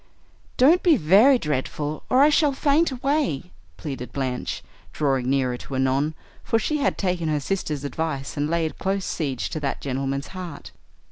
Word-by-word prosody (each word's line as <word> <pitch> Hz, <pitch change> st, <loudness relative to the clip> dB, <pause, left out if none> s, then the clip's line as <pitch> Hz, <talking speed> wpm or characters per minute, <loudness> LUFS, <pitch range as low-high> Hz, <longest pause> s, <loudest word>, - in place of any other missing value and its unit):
"Don't 310 Hz, +8 st, +5 dB
be 335 Hz, -5 st, +5 dB
very 215 Hz, -, +6 dB
dreadful, 150 Hz, -, -3 dB
or 260 Hz, +2 st, +5 dB
I 295 Hz, -, +6 dB
shall 295 Hz, -1 st, +3 dB
faint 290 Hz, +4 st, +2 dB
away," 265 Hz, -, -1 dB, 0.3 s
pleaded 130 Hz, -4 st, -6 dB
Blanche, 130 Hz, -2 st, -3 dB, 0.3 s
drawing 135 Hz, -, 0 dB
nearer 130 Hz, -2 st, +1 dB
to 135 Hz, -, -7 dB
Annon, 135 Hz, +4 st, +1 dB, 0.3 s
for 225 Hz, -, +1 dB
she 300 Hz, +7 st, 0 dB
had 285 Hz, -2 st, 0 dB
taken 180 Hz, -4 st, -1 dB
her 150 Hz, -1 st, +1 dB
sister's 150 Hz, -3 st, -3 dB
advice, 140 Hz, -1 st, -3 dB
and 145 Hz, +1 st, -1 dB
laid 165 Hz, -1 st, -1 dB
close 195 Hz, 0 st, -1 dB
siege 135 Hz, -6 st, -3 dB
to 155 Hz, -, -3 dB
that 140 Hz, -2 st, -2 dB
gentleman's 135 Hz, +1 st, -3 dB
heart. 180 Hz, -6 st, -8 dB
155 Hz, 160 wpm, -24 LUFS, -, 0.3 s, very